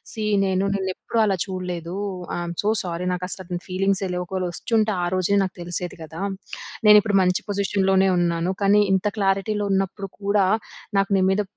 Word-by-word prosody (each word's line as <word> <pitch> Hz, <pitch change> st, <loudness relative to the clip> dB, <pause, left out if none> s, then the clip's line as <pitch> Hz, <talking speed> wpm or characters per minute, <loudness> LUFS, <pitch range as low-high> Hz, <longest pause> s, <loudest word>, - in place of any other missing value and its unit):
See 220 Hz, -, -5 dB, 0.2 s
నేను 190 Hz, 0 st, +1 dB
నిన్ను 190 Hz, -1 st, -1 dB
ఎప్పుడూ 230 Hz, -, -4 dB
అలా 195 Hz, -2 st, +1 dB
చూడలేదూ. 180 Hz, -3 st, -5 dB, 0.4 s
I'm 175 Hz, 0 st, -4 dB
so 205 Hz, -, 0 dB
sorry. 175 Hz, -1 st, -4 dB
నాకు 180 Hz, 0 st, -3 dB
అసల 190 Hz, +1 st, -5 dB
అతని 175 Hz, -1 st, -4 dB
ఫీలింగ్సే 195 Hz, +1 st, 0 dB
లేవు. 180 Hz, 0 st, -2 dB
ఒకవేళ 185 Hz, 0 st, -3 dB
వచ్చుంటే 215 Hz, +4 st, 0 dB
ఆ -, -, +1 dB
రోజే 185 Hz, +2 st, +1 dB
నాకు 185 Hz, -1 st, -3 dB
తెలిసేది 175 Hz, +1 st, -4 dB
కదా! 160 Hz, +3 st, -8 dB, 0.7 s
నేను 210 Hz, 0 st, +9 dB
ఇప్పుడు 205 Hz, -1 st, 0 dB
మంచి 180 Hz, -1 st, +2 dB
పొజిషన్‌లోనే 195 Hz, -1 st, +2 dB
ఉన్నాను. 170 Hz, 0 st, +1 dB
కానీ 200 Hz, +1 st, +5 dB
ఇంత 190 Hz, +2 st, +1 dB
క్లారిటీలో 200 Hz, +1 st, +1 dB
ఉన్నప్పుడు 195 Hz, +1 st, -1 dB
కూడా 200 Hz, 0 st, +3 dB, 0.5 s
నాకు 195 Hz, +1 st, +1 dB
నీ -, -, +2 dB
మీద, 200 Hz, +2 st, +2 dB
190 Hz, 175 wpm, -23 LUFS, 180-200 Hz, 0.7 s, నేను